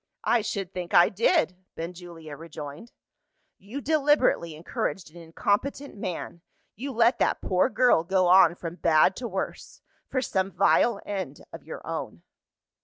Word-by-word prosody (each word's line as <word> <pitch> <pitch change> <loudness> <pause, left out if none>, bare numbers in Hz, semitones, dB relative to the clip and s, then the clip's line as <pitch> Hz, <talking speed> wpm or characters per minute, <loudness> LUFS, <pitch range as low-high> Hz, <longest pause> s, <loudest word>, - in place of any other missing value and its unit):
"I 240 - +3
should 195 -3 -4
think 180 -1 -4
I 175 - +7
did!" 230 - +2 0.2
Benjulia 165 -2 -8
rejoined. 155 +5 -9 0.7
"You 225 +9 -7
deliberately 290 - +2
encouraged 165 +1 -4
an 175 - -11
incompetent 205 - -2
man; 180 -3 -5 0.3
you 275 +6 -5
let 235 +1 +3
that - - +1
poor 185 +6 +1
girl 250 -10 +3
go 185 +1 +2
on 175 -1 +6
from 170 0 -7
bad 165 +3 +4
to 245 - -4
worse 190 -3 -5 0.3
for 260 - 0
some 190 -4 -1
vile 200 +4 +3
end 190 -8 -5
of - - -9
your - - -9
own." - - -5
185 Hz, 145 wpm, -26 LUFS, 170-235 Hz, 0.7 s, I